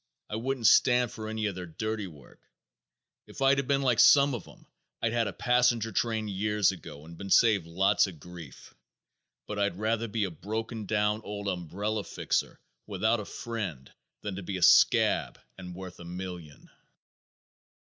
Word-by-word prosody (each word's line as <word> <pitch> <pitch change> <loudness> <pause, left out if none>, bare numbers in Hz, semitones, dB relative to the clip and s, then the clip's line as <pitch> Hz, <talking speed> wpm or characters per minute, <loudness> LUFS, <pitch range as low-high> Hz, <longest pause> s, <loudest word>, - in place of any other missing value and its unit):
I - - -2
wouldn't 125 +1 -3
stand 125 +1 +5
for 110 -1 -7
any 110 0 -2
of 105 - -1
their 90 -1 -7
dirty 110 +5 -4
work. 75 -7 -16 0.9
If - - -12
I'd 135 0 +3
been 140 -1 +1
like 125 -4 +2
some 140 -1 +6
of 115 -7 -6
'em - - -17 0.3
I'd 115 0 -1
had 115 -2 +1
a - - -3
passenger 125 -2 +2
train 110 -2 -1
years 105 0 +1
ago 75 -4 -10
and 85 0 -12
been 100 - -7
saved 100 -6 +4
lots 95 +5 +2
of 85 -5 -10
grief. 85 -4 -12 0.7
But 105 -1 -5
I'd 100 -3 0
rather 110 +2 -1
be 110 0 -1
a 95 - -2
broken 110 +5 -5
down 105 0 +1
old 100 0 -6
umbrella 100 +4 -3
fixer - - -2 0.3
without 110 +3 +1
a 105 - -6
friend 100 - -6 0.3
than 100 -3 -5
to - - -5
be 95 +1 -4
a 90 - -2
scab - - +4 0.2
and 90 -2 -9
worth 95 -1 -9
a - - -9
million." 90 -4 -8
105 Hz, 170 wpm, -28 LUFS, 90-115 Hz, 0.9 s, some